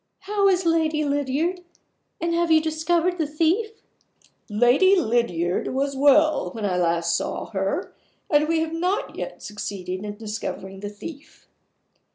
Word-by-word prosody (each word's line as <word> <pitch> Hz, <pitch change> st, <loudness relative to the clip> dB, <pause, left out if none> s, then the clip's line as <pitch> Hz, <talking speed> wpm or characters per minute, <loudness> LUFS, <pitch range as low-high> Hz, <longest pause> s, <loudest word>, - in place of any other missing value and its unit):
How 400 Hz, +1 st, +1 dB
is 370 Hz, -2 st, +2 dB
Lady 320 Hz, -2 st, +2 dB
Lydiard? 290 Hz, +6 st, -1 dB, 0.6 s
And 335 Hz, 0 st, -1 dB
have 340 Hz, 0 st, +1 dB
you 320 Hz, -1 st, +6 dB
discovered 330 Hz, +3 st, 0 dB
the 315 Hz, -, +1 dB
thief?" 350 Hz, +9 st, 0 dB, 0.7 s
"Lady 245 Hz, -, +4 dB
Lydiard 220 Hz, -, 0 dB
was 275 Hz, +1 st, 0 dB
well 290 Hz, -, +4 dB
when 220 Hz, -2 st, -4 dB
I 185 Hz, -3 st, 0 dB
last 170 Hz, -1 st, +1 dB
saw -, -, -3 dB
her; 195 Hz, -, -2 dB, 0.3 s
and 300 Hz, 0 st, +3 dB
we 325 Hz, 0 st, +1 dB
have 320 Hz, 0 st, -2 dB
not 360 Hz, +5 st, -1 dB
yet -, -, -6 dB
succeeded 190 Hz, -2 st, -5 dB
in 205 Hz, 0 st, -5 dB
discovering 210 Hz, -3 st, -6 dB
the 205 Hz, +1 st, -5 dB
thief." 285 Hz, +8 st, -11 dB
295 Hz, 145 wpm, -24 LUFS, 210-335 Hz, 0.7 s, you